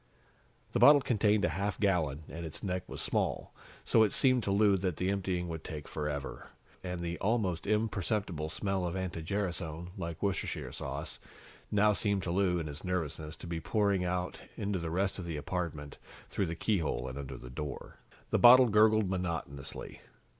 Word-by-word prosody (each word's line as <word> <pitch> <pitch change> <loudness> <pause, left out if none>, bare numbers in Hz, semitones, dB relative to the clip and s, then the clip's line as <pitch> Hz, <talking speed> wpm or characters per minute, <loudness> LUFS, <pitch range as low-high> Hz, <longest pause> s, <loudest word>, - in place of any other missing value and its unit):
The - - 0
bottle 145 -1 +8
contained 105 -5 +2
a - - +2
half 100 +5 -2
gallon, 80 -8 +1
and 85 - -7
its 80 -2 -7
neck 90 -2 -3
was - - -5
small, - - -1 0.3
so 110 - +4
it 110 - +4
seemed 130 -2 +4
to 100 - 0
Lou 100 0 +5
that 90 -3 -2
the 95 +1 0
emptying 95 -3 -1
would 80 -1 -5
take 75 -4 -7
forever. 75 -2 -4 0.4
And 90 -1 -4
the 85 0 -3
almost 100 -6 0
imperceptible 100 -6 0
smell 95 +4 -1
of 85 - -3
anti 90 -3 -3
gerasone, 85 -2 -3
like 85 -3 -5
Worcestershire 100 -2 -2
sauce, - - -5 0.5
now 105 0 +4
seemed 100 -1 0
to 85 - -2
Lou, 90 -1 +2
in 85 - -2
his 75 -1 -7
nervousness, 80 -4 -3
to - - -11
be 85 -1 -3
pouring 100 0 +1
out 90 0 -2 0.2
into 100 -2 -1
the 85 -1 -3
rest 95 +4 0
of 90 - -5
the 85 -3 -3
apartment, 75 -2 -4 0.3
through 95 - 0
the 85 - -3
keyhole 80 - 0
and 65 +2 -5
under 65 -2 -6
the - - -10
door. 75 +2 -6 0.3
The - - +3
bottle 125 0 +9
gurgled 110 0 +5
monotonously. 85 -7 -4
90 Hz, 180 wpm, -32 LUFS, 80-100 Hz, 0.5 s, bottle